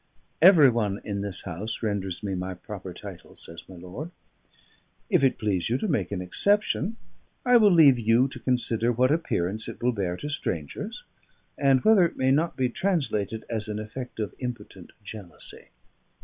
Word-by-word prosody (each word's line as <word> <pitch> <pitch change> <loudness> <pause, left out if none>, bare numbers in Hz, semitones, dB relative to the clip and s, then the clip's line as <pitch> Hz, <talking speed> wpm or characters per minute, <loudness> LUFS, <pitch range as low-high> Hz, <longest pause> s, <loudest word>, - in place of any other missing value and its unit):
"Every 165 -7 +8
one 105 -4 -1
in 100 -2 -3
this 100 -2 -4
house 100 +6 -5
renders 100 -4 -2
me 100 -2 -2
my 95 0 -4
proper 95 0 -8
title," 95 -1 -11
says 85 0 -8
my 95 - -10
lord. 90 - -7 1.0
"If 180 -7 +4
it 135 - +3
please 100 -5 -1
you 120 - +1
to 215 - -2
make 105 - -1
an 95 -2 -3
exception, 205 - +1 0.5
I 250 -1 +6
will 215 -3 +6
leave 150 -8 +6
you 115 +3 +3
to - - -9
consider 120 -2 +1
what 125 +3 +2
appearance 110 - -1
it - - -7
will 125 - +3
bear 95 -6 -2
to 145 - -5
strangers, 80 - -4 0.5
and 135 -2 +3
whether 215 -4 +6
it 170 - -1
may 130 0 +2
not 160 +5 +1
be 130 -1 +2
translated 120 - -1
as 110 -1 -3
an 105 -1 -3
effect 115 +3 -7
of 105 - -3
impotent 115 -7 -7
jealousy." 100 -4 -10
110 Hz, 175 wpm, -26 LUFS, 100-140 Hz, 1.0 s, Every